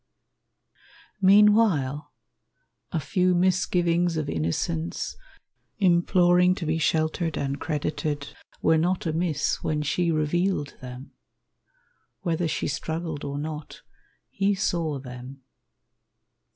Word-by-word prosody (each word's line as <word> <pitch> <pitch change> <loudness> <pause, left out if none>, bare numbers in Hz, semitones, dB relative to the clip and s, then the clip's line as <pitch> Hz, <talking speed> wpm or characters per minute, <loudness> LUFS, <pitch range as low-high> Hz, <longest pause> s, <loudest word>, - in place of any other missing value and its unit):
Meanwhile, 190 -8 +4 0.8
a 165 - 0
few 180 +5 +1
misgivings 175 -1 +2
of 155 -2 -2
innocence, 80 +1 -2 0.6
Imploring 180 -1 +4
to 180 - -5
be 160 +1 0
sheltered 155 0 0
and 140 0 -2
credited, 150 -1 -3 0.3
Were 160 0 +4
not 180 +3 0
amiss 165 -1 0
when 150 -1 -1
she 170 +3 +1
revealed 155 0 0
them. 125 +2 -9 1.1
Whether 170 -1 0
she - - -2
struggled 160 +1 -4
or 140 0 -4
not, 150 0 -6 0.5
he 200 +1 +1
saw 170 -6 -1
them. 130 +1 -10
160 Hz, 100 wpm, -26 LUFS, 145-175 Hz, 1.1 s, Meanwhile